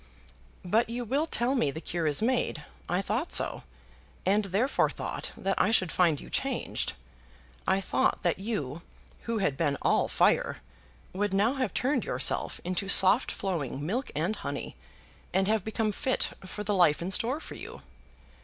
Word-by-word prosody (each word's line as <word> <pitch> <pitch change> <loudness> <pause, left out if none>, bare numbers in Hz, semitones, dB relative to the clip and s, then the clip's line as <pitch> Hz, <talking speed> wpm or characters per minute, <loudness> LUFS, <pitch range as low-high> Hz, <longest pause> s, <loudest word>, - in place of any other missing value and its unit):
"But 220 +6 +2
you 240 +1 -3
will 280 +8 0
tell 245 -3 0
me 245 - +2
the 155 - -5
cure 165 +1 -3
was 150 +6 +2
made. 235 -10 0 0.3
I 180 +3 +1
thought 235 - -2
so, - - +1 0.6
and 205 +2 +3
therefore 205 +9 +1
thought - - -4
that 195 0 0
I 205 - +3
should 185 -6 +2
find 170 -5 +3
you - - -11
changed. - - -1 0.7
I 195 - +3
thought - - +1
that 175 0 +1
you, 170 - -3 0.4
who 230 -1 -1
had 170 -9 +1
been 145 -2 0
all - - +3
fire, - - +2 0.6
would 200 +1 0
now 215 +6 +3
have 265 -2 -1
turned 265 -1 +1
yourself - - 0
into 185 +2 -2
soft 200 +6 +6
flowing 150 -7 -3
milk 240 - -2
and 170 +8 0
honey, 140 -5 -5 0.6
and 190 0 +3
have 215 -2 +1
become 220 0 0
fit 260 +5 0 0.2
for 210 +3 -5
the 210 - 0
life 175 -6 +4
in 185 - -3
store 245 +9 +1
for - - -9
you. - - -9
195 Hz, 170 wpm, -29 LUFS, 175-230 Hz, 0.7 s, soft